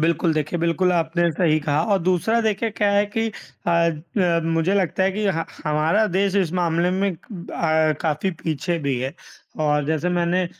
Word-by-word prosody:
बिल्कुल 165 +1 +2
देखिए, 155 +3 -1
बिल्कुल 170 +2 +1
आपने 170 0 +1
सही 155 -1 +2
कहा 145 +1 0
और 195 - +4
दूसरा 185 +6 +2
देखिए 220 0 0
क्या 205 -1 +1
है 200 0 +3
कि 225 0 +1 0.4
अ - - +2 0.5
अ, 175 -3 +2
मुझे 165 +3 +1
लगता 190 -1 +1
है 190 +1 +2
कि 210 +2 -2
ह 165 0 -1 0.2
हमारा 155 +8 +2
देश 195 +1 0
इस 180 -5 +1
मामले 175 -1 +1
में 190 0 0
क 175 +1 -11
अ, 155 -2 +1
काफ़ी 160 +3 0
पीछे 165 +2 -1
भी 140 -4 -1
है। 130 +2 -3 0.5
और 150 -1 +2
जैसे 160 +2 0
मैंने 175 +1 +1
170 Hz, 185 wpm, -22 LUFS, 160-190 Hz, 0.5 s, और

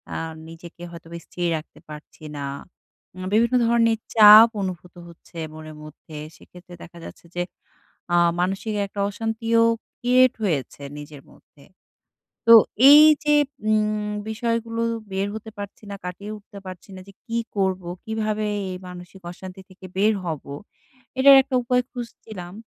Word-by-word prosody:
আর 165 0 -4 0.2
নিজেকে 170 +1 -13
হয়তো 170 -1 -12
বা 170 - -6
স্থির 175 -1 -3
রাখতে 155 - -12
পারছি 150 +1 -12
না। - - -5 0.8
আ - - -9
বিভিন্ন 235 +3 +3
ধরনের 230 -1 +3 0.2
চাপ 215 +1 +10
অনুভূত 180 -2 -6
হচ্ছে 170 0 -16 0.2
মনের 155 0 -10
মধ্যে। 155 +1 -13 0.2
সেক্ষেত্রে 180 0 -16
দেখা 170 - -14
যাচ্ছে - - -12
যে 175 - 0 0.7
আ - - +5 0.2
মানসিক 195 +4 -2
একটা 200 +1 -7
অশান্তিও 225 +2 0 0.4
ক্রিয়েট 255 +1 +4
হয়েছে 145 - -2 0.2
নিজের 145 -1 -11
মধ্যে। 140 - -22 0.9
তো - - +12 0.3
এই 295 +1 +10 0.2
যে 295 0 +2 0.3
উম 215 -1 0 0.2
বিষয়গুলো 230 +1 -2 0.3
বের 195 +1 -1
হতে 220 0 -8
পারছি 205 +1 -9
না, - - -5
কাটিয়ে 190 +4 -7
উঠতে 205 0 -15
পারছি 185 +1 -10
না - - -9
যে 200 - -14
কি 230 -1 -3 0.2
করবো? 190 -2 -1 0.2
কিভাবে 215 -1 -2 0.3
এই 185 - -5
মানসিক 180 +1 -11
অশান্তি 185 +1 -11
থেকে 185 0 -14
বের 210 +3 +3
হব? 160 -5 -4 0.8
এটার 275 +1 +8
একটা 265 -1 -3
উপায় 250 +1 +1
খুঁজছিলাম। 220 -7 -9
200 Hz, 145 wpm, -23 LUFS, 175-225 Hz, 0.9 s, তো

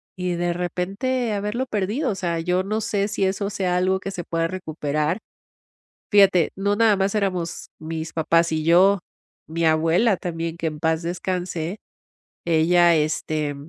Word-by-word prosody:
y 180 -1 -2
de 175 0 0
repente 200 +8 -2
haberlo 210 +5 -2
perdido, 220 +5 -1
o - - -3
sea, 170 -3 -2
yo 180 +2 0
no 215 +3 -2
sé 200 -1 0
si 200 -1 -1
eso 200 +1 -1
sea 190 -3 -1
algo 190 +1 +1
que 195 - -5
se 180 -2 -5
pueda 165 0 -1
recuperar. 155 -4 -2 1.0
Fíjate. 195 -5 +5
No, 200 +1 +1
nada 220 -2 +4
más 195 +1 0
éramos 185 -5 -2
mis 160 0 -5
papás 165 +1 +2
y 155 -1 -1
yo, 185 +4 +5 0.5
mi 165 +1 -2
abuela 165 +7 +3
también, 165 -1 -4
que 165 -1 -2
en 155 -1 -7
paz 160 +1 0
descanse. 175 0 -3 0.7
Ella 170 +1 +4
este 155 -1 -1
180 Hz, 160 wpm, -23 LUFS, 165-200 Hz, 1.0 s, Fíjate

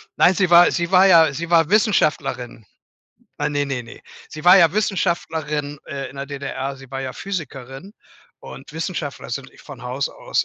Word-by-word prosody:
Nein, 180 - +5
sie 185 -3 +1
war 175 0 +7
sie 170 +1 -2
war 190 +1 +6
ja 165 -5 +6
sie 170 +4 -5
war 165 -2 +4
Wissenschaftlerin. 155 - 0 0.7
Ah, - - -1
ne, 145 -1 -1
ne, 135 -3 -4
ne, 115 - -13 0.3
sie 155 0 -10
war 180 +2 +8
ja 165 -3 +5
Wissenschaftlerin, 160 -7 -2
äh, 140 -2 -5
in 140 - -15
der 140 0 -5
DDR. 140 -1 -5
Sie 135 -1 -15
war 135 0 -5
ja 130 -1 -5
Physikerin 150 -2 -7 0.5
und - - -12
Wissenschaftler - - -5
sind - - -5
von - - -12
Haus - - -3
aus - - -2
155 Hz, 180 wpm, -21 LUFS, 140-180 Hz, 0.7 s, war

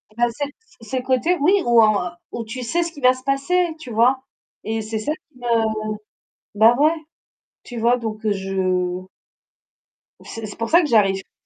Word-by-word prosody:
Il 235 - -7
a - - +5
ses 285 +5 -3 0.4
ses 255 +3 -3
côtés 260 +7 +1
oui 360 +7 +4
où 235 -1 +6
en 205 -5 +2 0.3
tu 255 +3 -6
sais 340 +9 0
ce 335 - -5
qui 290 - -12
va 255 0 +6
se 255 0 -12
passer, 280 +7 +1
tu 255 - -10
vois? 245 +4 +3 0.4
Et 225 0 -2
c'est 220 +1 -4
ça 255 +8 -2
qui 300 -4 -17
me 230 -2 +1 0.8
bah, 225 +3 +6
ouais, 305 +3 +4 0.7
tu 245 - -7
vois? 235 +2 +3
Donc 220 -1 -5
je 185 -2 -1 1.2
C'est 225 -1 -7
c'est 205 - -8
pour 230 0 -3
ça 340 +2 +6
que 320 - -1
j'arrive 200 -6 +3
plus - - -50
235 Hz, 185 wpm, -21 LUFS, 215-270 Hz, 1.2 s, où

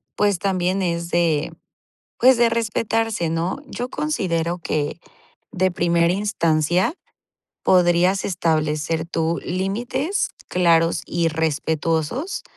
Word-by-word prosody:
pues 205 -3 +1
también 190 0 0
es 170 -1 -2
de, 165 -4 +1 0.7
pues, 255 0 +6
de 235 -1 +5
respetarse, 225 -4 -1
¿no? 165 +7 -1
Yo 245 - -5
considero 175 - -1
que, 155 -1 -2 0.5
de 185 0 +1
primera 170 -1 +2
instancia, 180 - +1 0.7
podrías 180 +1 +3
establecer 160 -2 0
tú 165 0 -1
límites, 240 - -1 0.2
claros 170 -2 +2
y 170 -1 0
respetuosos. 160 - -1
175 Hz, 100 wpm, -22 LUFS, 165-200 Hz, 0.7 s, pues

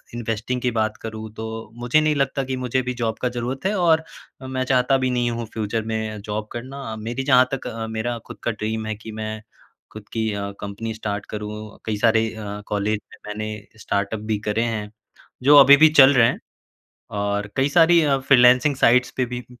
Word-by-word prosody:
Investing 120 +2 -3
की 125 - 0
बात 110 -1 -1
करूँ 110 -1 -6
तो 110 - -5 0.3
मुझे 120 +6 +3
नहीं 155 -1 +2
लगता 135 0 0
कि 130 0 -3
मुझे 130 0 -1
अभी 125 0 -2
जॉब 115 -1 -1
का 125 - +1
ज़रूरत 125 +5 -4
है 195 - +2
और 160 -2 +3 0.4
मैं 130 0 -3
चाहता 130 +1 +3
भी 130 -1 0
नहीं 120 -1 +1
हूँ 115 0 -4
फ्यूचर 110 0 -2
में 110 -1 -3
जॉब 105 +1 -4
करना। 125 -1 -6
मेरी 115 +4 -4
जहाँ 130 -2 +5
तक 135 - -4
अ, 115 0 -5
मेरा 110 +2 -3
खुद - - -9
का 120 - 0
ड्रीम 110 +1 -3
है 110 0 -3
कि 110 +1 -10
मैं 110 0 -5 0.5
खुद 110 -1 -11
की 110 -1 -1
अ, 100 0 -4
कंपनी 105 +3 -5
स्टार्ट 105 -2 -4
करूँ, 105 0 -7
कई 110 -1 -2
सारे 115 +1 +3
अ, 105 -1 -6
कॉलेज 105 +1 -1
में - - -13
मैंने 105 0 -6
स्टार्टअप 100 +2 -2
भी 105 - -1
करे 110 +2 +1
हैं, 110 -3 -3 0.5
जो 145 +2 +7
अभी 140 0 +9
भी 155 +2 +7
चल 140 -2 +7
रहे 120 -3 +5
हैं - - -2 0.8
और 100 0 -2
कई 135 +2 +2
सारी 170 +2 +5
अ, 140 -2 +2
फ्रीलांसिंग 130 +1 +5
साइट्स 125 -1 +3
पे 130 - +2
भी 125 0 -6
115 Hz, 200 wpm, -22 LUFS, 110-130 Hz, 0.8 s, अभी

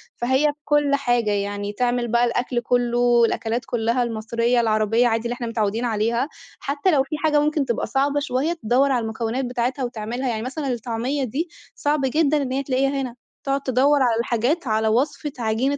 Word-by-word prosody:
فهي 260 +4 +1
في 295 0 0
كل 295 -1 +3
حاجة، 240 -5 +1
يعني 205 0 -2
تعمل 245 +1 0
بقى 235 +1 +3
الأكل 245 +1 -1
كُلّه 240 0 0
والأكلات 235 -1 +2
كُلّها 235 +1 0
المصريّة 235 +1 0
العربيّة 220 +1 +2
عادي 225 -1 0
اللي 235 - -1
إحنا 245 -1 -5
متعودين 225 0 -1
عليها، 230 +4 0 0.3
حتّى 290 +5 0
لو 280 -5 +3
في 290 +3 -5
حاجة 300 -1 +4
ممكن 300 -1 +1
تبقى 235 -3 -1
صعبة 280 +1 +1
شويّة 285 +3 -1
تدوّر 275 -2 +1
على 245 -3 +1
المكونات 225 +3 -2
بتاعتها 250 +2 -2
وتعملها، 240 +2 -3
يعني 220 -2 -2
مثلًا 275 +4 -4
الطعمية 240 +4 -2
دي 280 +8 -3 0.3
صعب 295 0 0
جدًا 295 +2 +2
إن 260 -2 -3
هي 270 +1 -1
تلاقيها 270 0 +1
هنا، 250 -3 -5 0.3
تقعد 275 0 0
تدوّر 275 +2 +3
على 230 -2 +2
الحاجات 245 +7 0
على 220 0 +1
وصفة 270 +6 0
عجينة 240 +5 0
245 Hz, 185 wpm, -22 LUFS, 230-275 Hz, 0.3 s, حاجة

